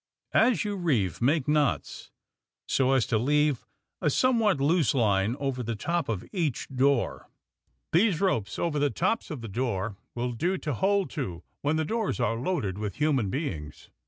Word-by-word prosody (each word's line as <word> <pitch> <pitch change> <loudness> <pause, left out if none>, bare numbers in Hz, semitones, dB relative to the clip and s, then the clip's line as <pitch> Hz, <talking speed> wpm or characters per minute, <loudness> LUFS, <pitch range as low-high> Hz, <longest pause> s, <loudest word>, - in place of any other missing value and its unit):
As 230 -1 +4
you 205 -1 -2
reeve, 120 - 0
make 140 +3 +2
knots, 150 -2 0 0.6
so 135 0 +2
as 130 -4 +3
to 110 - +1
leave 150 +1 +1 0.3
a 160 - +2
some 255 - +3
what 205 -9 +2
loose 145 -1 +2
line 105 -2 +2
over 135 -2 -2
the 115 -1 -3
top 170 +9 -1
of 105 -5 -2
each 165 - -1
door. 135 -1 +1 0.6
These 180 -1 +3
ropes 115 - 0
over 160 -4 0
the 145 0 +2
tops 190 - -1
of 150 -6 -5
the 115 - -6
door 105 -2 -2 0.2
will 125 +1 -1
do 175 +11 -1
to 150 -5 -3
hold 195 - +1
to 90 - -4 0.2
when 145 +2 +1
the 160 0 0
doors 220 - -1
are 115 -2 +1
loaded 110 - -2
with 105 -2 -3
human 145 -9 +1
beings. 80 - -5
140 Hz, 175 wpm, -27 LUFS, 115-170 Hz, 0.6 s, As